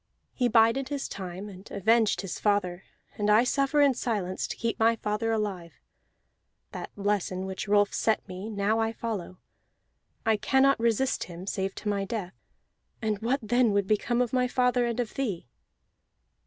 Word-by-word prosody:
He 250 - +1
bided 230 +3 +3
his 285 -2 -3
time 185 +1 -6
and 195 0 -11
avenged 220 +2 +2
his 195 -3 -5
father; 195 -3 0 0.3
and 205 0 +1
I 215 +3 +6
suffer 275 +3 +2
in 280 -2 +5
silence, 205 -7 -2
to - - -5
keep 230 -1 -2
my 225 +1 +4
father 210 +1 -1
alive. 200 -6 -2 1.0
That - - -6
lesson 200 -2 -1
which 190 +2 -5
Rolf 205 0 +3
set 220 -2 0
me, 185 +3 -6
now 210 +1 0
I 225 0 0
follow; 205 -6 -5 0.9
I 220 -1 +3
cannot 270 +4 +3
resist 235 +3 +1
him, 175 +1 -9
save 195 -1 -2
to - - -7
my 200 -1 0
death, 195 -3 -4 0.7
and 215 -2 -1
what 250 +5 0
then 240 0 +3
would 200 -1 +2
become 235 +4 +1
of 240 - -5
my 250 -1 +2
father 250 -1 +2
and 235 0 -2
of 235 -3 -2
thee?" 215 -11 -3
215 Hz, 170 wpm, -28 LUFS, 200-240 Hz, 1.0 s, I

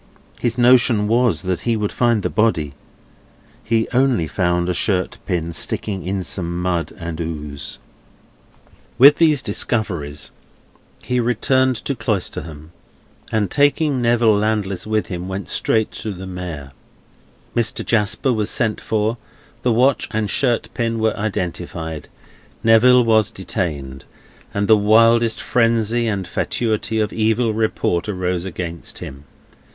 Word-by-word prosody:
His 120 -1 -1
notion 120 -3 +4
was, 115 -7 +2
that 90 -1 -2
he 115 -2 0
would 105 -1 -2
find 120 -4 +1
the - - 0
body; 85 -11 +1 0.9
he 115 0 +1
only 125 -10 +2
found 90 +1 0
a 90 - 0
shirt 90 0 -1
pin 85 -3 -2
sticking 95 +2 -2
in 95 +2 -2
some 85 0 -3
mud 90 -2 -1
and 85 -1 -6
ooze. 75 -3 -6 1.2
With 140 +4 +8
these 155 -5 +3
discoveries 85 - -2 0.7
he 125 0 0
returned 130 +2 +2
to 140 - 0
Cloisterham, 85 - -3 0.6
and, 105 -4 0
taking 145 -1 +2
Neville 115 -2 +3
Landless 105 -2 -1
with 110 -3 0
him, 90 -1 -5
went 95 0 -5
straight 110 -1 +1
to 110 - -5
the 95 -1 -8
Mayor. 90 -7 -7 0.8
Mr. 115 -1 0
Jasper 110 +4 +1
was 105 -2 -1
sent 110 -2 0
for, 110 +1 -1 0.4
the 125 - +1
watch 125 +4 +2
and 110 -2 -2
shirt 125 -4 +1
pin 115 -2 -1
were 110 -1 +1
identified, 85 -6 -4 0.6
Neville 120 +3 +6
was 110 -2 +3
detained, 70 -8 -4 0.5
and 100 0 -1
the 110 - +7
wildest 115 +2 +4
frenzy 115 0 +1
and 100 -4 -2
fatuity 110 -1 -1
of 105 - -1
evil 110 +1 +1
report 110 -5 0
rose 90 -3 -2
against 85 -2 -5
him. 70 +2 -9
105 Hz, 135 wpm, -20 LUFS, 90-115 Hz, 1.2 s, With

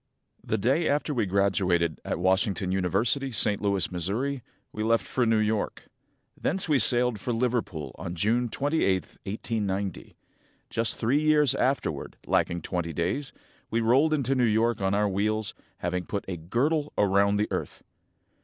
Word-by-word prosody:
The 110 - -1
day 135 - +1
after 150 +1 0
we 115 -5 +1
were - - -6
graduated 90 -4 +1
at - - -2
Washington 95 +2 +1
University, 100 - +1
St. 105 -3 +3
Louis, 100 -3 +1
Mo., 110 - -2 0.3
we 110 - -4
left 115 +1 +2
for 125 -3 0
New 110 0 +3
York. 110 0 -1 0.5
Thence 185 +3 -2
we 150 -4 +3
sailed 120 0 +5
for 120 - -3
Liverpool 115 - -2
on 85 - -5
June 115 +7 +1
23, 145 +7 0
1890. 100 +1 -4 0.6
Just 115 -1 -1
three 130 +7 +1
years 150 -3 +4
afterward, 130 - -1
lacking 85 -1 0
twenty 85 -3 -3
days, 130 - -1 0.4
we 115 - 0
rolled 130 +7 +3
into 135 -4 +1
New 130 -2 +1
York 115 0 +2
on 95 +1 +1
our 105 0 +2
wheels, 105 +2 -1 0.2
having 90 0 -3
"put 100 - -3
a 95 - -3
girdle 140 - -1
round 100 0 +3
the 105 - +1
earth." - - -4
110 Hz, 155 wpm, -27 LUFS, 95-125 Hz, 0.6 s, sailed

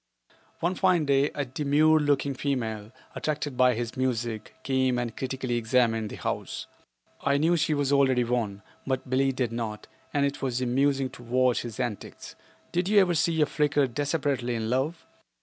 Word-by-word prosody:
One 175 +2 +1
fine 185 -4 +2
day 140 +1 +3
a 145 - -1
demure 150 +4 +3
looking 145 -1 +1
female, 115 -6 -3 0.2
attracted 150 -3 -3
by 125 -1 +4
his 120 0 -4
music, 120 -4 -2
came 130 -2 +1
and 120 -2 -3
critically 130 -2 -2
examined 115 -2 +1
the - - -7
house. - - -4 0.6
I 140 0 +2
knew 165 +4 +3
she 155 -1 +1
was 145 -1 0
already 130 -3 +4
won, 115 -4 -2 0.2
but 130 -1 -1
Billie 135 +1 +3
did 125 -3 -2
not, 115 -2 -4 0.3
and 140 -1 +2
it 140 +1 -3
was 125 -3 -1
amusing 135 +1 +1
to 125 - -12
watch 125 +1 +2
his 120 -2 -7
antics. 120 -6 -5 0.4
Did 180 +2 0
you 210 -1 +6
ever 185 -3 +3
see 160 0 +1
a - - +6
Flicker 145 -1 +1
desperately 140 -2 -1
in 110 0 -2
love? 140 +6 -1
130 Hz, 170 wpm, -27 LUFS, 120-145 Hz, 0.6 s, you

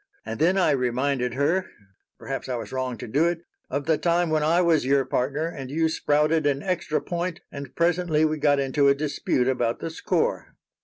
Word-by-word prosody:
And - - -5
then 175 +5 +3
I 180 -5 +3
reminded 125 -1 0
her 160 +7 +1 0.5
perhaps 135 -1 -5
I 125 - -1
was 115 - -6
wrong 130 -2 -3
to - - -7
do 145 +9 +2
it 170 -1 -2 0.3
of 140 +1 -2
the 160 -1 +2
time 170 -1 +1
when 155 -1 +2
I 160 +3 +3
was 170 -4 +3
your 135 +1 +2
partner 135 +4 -1
and 135 -6 -7
you 160 +3 +1
sprouted 150 0 +1
an 140 0 0
extra 175 -5 -1
point 175 0 -4
and 140 -2 -8
presently 170 -2 +2
we 155 0 -1
got 145 -1 +3
into 140 +1 +2
a 140 - +5
dispute 140 -3 -1
about 120 -3 0
the 165 - -5
score." 160 - -1
150 Hz, 200 wpm, -25 LUFS, 135-165 Hz, 0.5 s, a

